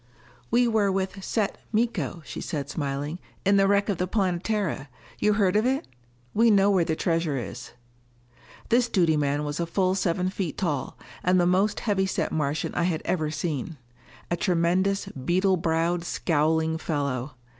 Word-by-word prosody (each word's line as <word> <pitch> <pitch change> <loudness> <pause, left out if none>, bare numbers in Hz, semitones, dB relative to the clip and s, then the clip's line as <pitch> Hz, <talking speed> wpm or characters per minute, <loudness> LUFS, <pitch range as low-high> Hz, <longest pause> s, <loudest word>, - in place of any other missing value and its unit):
"We 240 +1 +3
were 215 -4 +2
with 190 0 -2
Set 210 -1 -1
Miko," 205 - -1
she - - -6
said 145 -3 -4
smilingly, 145 +3 -3 0.2
"in 200 +1 +5
the 195 0 +4
wreck 200 0 +3
of 200 -5 -1
the 180 - 0
Planetara. 185 -5 -1 0.3
You 210 - +3
heard 200 -3 +2
of 215 - +4
it? 265 +1 0 0.5
We 230 +2 +4
know 200 -1 +5
where 185 -3 +3
the 160 -1 -1
treasure 165 -4 0
is." 120 0 -7 1.0
This 240 0 +3
duty 170 -5 +3
man 145 0 0
was 145 +1 -3
a 170 - -1
full 185 +1 +1
seven 185 -1 0
feet 185 -6 -3
tall, 150 -8 -2 0.3
and 180 +1 +3
the 175 - +3
most 190 +4 +2
heavy 195 -3 +1
set - - -1
Martian 150 -1 -1
I 175 - +1
had 165 -3 -1
ever 155 -4 0
seen. 155 -1 -3 0.5
A - - +3
tremendous, 185 +3 +1
beetle 185 +8 +1
browed, 165 +1 0
scowling 160 -1 +1
fellow. 140 -5 -2
175 Hz, 165 wpm, -26 LUFS, 155-195 Hz, 1.0 s, in